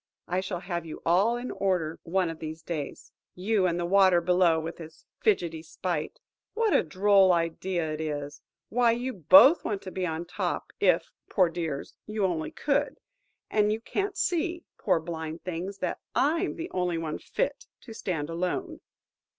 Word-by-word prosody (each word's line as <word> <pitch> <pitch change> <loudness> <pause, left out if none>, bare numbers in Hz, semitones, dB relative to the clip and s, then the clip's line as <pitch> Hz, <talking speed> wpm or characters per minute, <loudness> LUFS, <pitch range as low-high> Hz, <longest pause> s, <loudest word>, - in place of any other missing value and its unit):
I 180 +2 0
shall 185 -2 -4
have 175 -2 -3
you 160 -2 -8
all 195 +8 +3
in 245 +1 -5
order 180 -5 -1
one 180 0 0
of 160 - -10
these 160 0 -7
days. 155 -5 -5 0.2
You 195 +1 +1
and 175 0 -1
the 175 - -1
water 185 -1 +5
below, 175 -1 +3
with 165 +2 -6
his 160 -1 -11
fidgety 170 -7 +1
spite. 165 0 -4 0.4
What 450 -2 +2
a - - +5
droll 190 +3 +4
idea 170 0 0
it 155 - -4
is! 145 -2 -4 0.3
Why, 235 0 +3
you 250 +2 -3
both 275 - +7
want 205 -3 -3
to 185 - -7
be 185 - -3
at 160 -1 -2
the 170 - -5
top, 175 - -3
if–poor 185 -4 +2
dears!–you 170 +6 -3
only 170 -4 -1
could. 285 0 -1 0.5
And 210 -1 +3
you 215 - -1
can't 395 - -3
see–poor 340 - 0
blind 160 -1 -6
things!–that 185 +1 -4 0.2
I 325 +7 +2
'm - - -4
the 335 +1 -6
only 180 -2 0
one 160 -2 -3
fit - - -3
to 225 - -10
stand 165 -9 -3
alone!" 185 - -3
180 Hz, 165 wpm, -28 LUFS, 165-215 Hz, 0.5 s, both